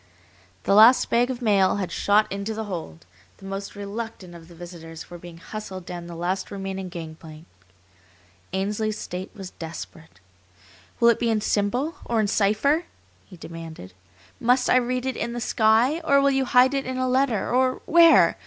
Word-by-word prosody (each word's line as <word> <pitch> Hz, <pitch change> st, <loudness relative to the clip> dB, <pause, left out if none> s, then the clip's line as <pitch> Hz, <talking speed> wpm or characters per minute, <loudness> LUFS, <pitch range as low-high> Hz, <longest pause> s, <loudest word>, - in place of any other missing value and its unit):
The -, -, +1 dB
last 225 Hz, +5 st, +6 dB
bag 240 Hz, +2 st, +3 dB
of 250 Hz, -1 st, -5 dB
mail 195 Hz, -4 st, +3 dB
had 190 Hz, -4 st, -3 dB
shot 205 Hz, +4 st, +3 dB
into 200 Hz, +3 st, -4 dB
the 220 Hz, -, -3 dB
hold, 160 Hz, -, -7 dB, 0.3 s
the 195 Hz, -, -14 dB
most 195 Hz, +1 st, -6 dB
reluctant 205 Hz, -2 st, -7 dB
of 165 Hz, -1 st, -13 dB
the 170 Hz, -, -15 dB
visitors 165 Hz, -2 st, -10 dB
were 175 Hz, -, -8 dB
being 175 Hz, -1 st, -11 dB
hustled 190 Hz, 0 st, -8 dB
down 175 Hz, -1 st, -7 dB
the 170 Hz, -, -8 dB
last 180 Hz, +3 st, -2 dB
remaining 195 Hz, -1 st, -5 dB
gangplank. 160 Hz, -2 st, -10 dB, 1.1 s
Ainsley's 210 Hz, +3 st, -2 dB
state 185 Hz, -2 st, -6 dB
was 195 Hz, -3 st, -8 dB
desperate. 160 Hz, -, -10 dB, 0.8 s
"Will 235 Hz, -, +6 dB
it 235 Hz, -, +2 dB
be 235 Hz, -, 0 dB
in 220 Hz, -1 st, +2 dB
symbol, 220 Hz, +10 st, -1 dB
or 230 Hz, -1 st, -1 dB
in 215 Hz, -, +2 dB
cipher?" 220 Hz, -, +1 dB, 0.4 s
he 185 Hz, -, -14 dB
demanded. 165 Hz, -, -10 dB, 0.5 s
"Must 250 Hz, +1 st, +2 dB
I -, -, +6 dB
read 250 Hz, 0 st, -1 dB
it 260 Hz, -2 st, -2 dB
in 235 Hz, -, -3 dB
the 240 Hz, -, -4 dB
sky, 230 Hz, +6 st, +2 dB
or 280 Hz, -3 st, +4 dB
will 280 Hz, 0 st, +3 dB
you 270 Hz, -1 st, +1 dB
hide 250 Hz, +2 st, +4 dB
it 275 Hz, -1 st, -2 dB
in 260 Hz, 0 st, -3 dB
a 255 Hz, 0 st, 0 dB
letter, 255 Hz, -4 st, +1 dB
or 255 Hz, 0 st, +1 dB
where? 335 Hz, 0 st, +6 dB
205 Hz, 180 wpm, -24 LUFS, 175-245 Hz, 1.1 s, last